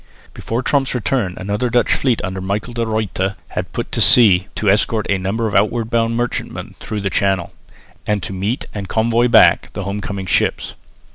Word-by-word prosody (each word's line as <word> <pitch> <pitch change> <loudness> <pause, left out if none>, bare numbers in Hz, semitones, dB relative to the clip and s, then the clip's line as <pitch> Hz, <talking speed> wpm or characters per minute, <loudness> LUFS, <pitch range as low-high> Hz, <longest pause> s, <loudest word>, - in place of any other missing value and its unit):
Before 115 +3 -3
Tromp's 135 -1 +1
return 115 -6 -1
another 105 +6 -2
Dutch 120 +1 +2
fleet 125 -6 0
under 95 -1 -4
Michael 100 +5 -3
de 115 -1 -2
Ruyter 105 -3 -2
had - - -5
put - - -5
to - - -1
sea 100 -6 +6
to 105 - -2
escort 105 +2 +2
a 100 - +1
number 100 +5 -2
of 110 - -2
outward 115 +1 +1
bound 115 0 +1
merchantmen 120 0 -4
through 105 -2 -4
the 100 -1 -2
Channel, 95 -2 0 0.5
and 105 -3 0
to 100 - -5
meet 100 +7 -2
and 100 -2 -6
convoy 115 +2 +2
back 120 - +5
the 100 - -4
home 100 +2 -4
coming 100 -1 -5
ships. 90 - 0
105 Hz, 190 wpm, -18 LUFS, 100-115 Hz, 0.5 s, sea